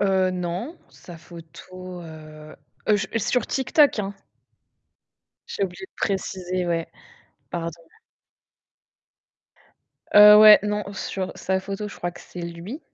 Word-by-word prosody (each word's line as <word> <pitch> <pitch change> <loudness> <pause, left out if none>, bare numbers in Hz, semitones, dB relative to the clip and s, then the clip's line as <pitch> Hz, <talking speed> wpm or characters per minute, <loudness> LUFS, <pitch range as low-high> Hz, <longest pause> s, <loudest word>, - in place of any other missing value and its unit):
Heu, 190 -2 +2
non, 180 - -4
sa 175 -2 -13
photo, 180 +2 -11
heu, 155 -1 -12 0.4
je 195 -2 -3
sur 240 +1 0
TikTok, 275 -1 +2
hein? 200 0 -5 1.3
J'ai - - -4
oublié 190 0 -7
de - - -64
préciser, 185 -2 -3
ouais, 165 -1 -1 0.6
pardon. 170 -1 -3 2.4
Heu, 210 0 +10
ouais, 215 0 +10
non, 210 0 -2
sur 190 -1 -4
sa 190 0 -1
photo, 200 +2 -5
je - - -11
crois 175 - -3
que - - -14
c'est 180 - -10
lui. 170 - -7
185 Hz, 120 wpm, -23 LUFS, 170-205 Hz, 2.4 s, Heu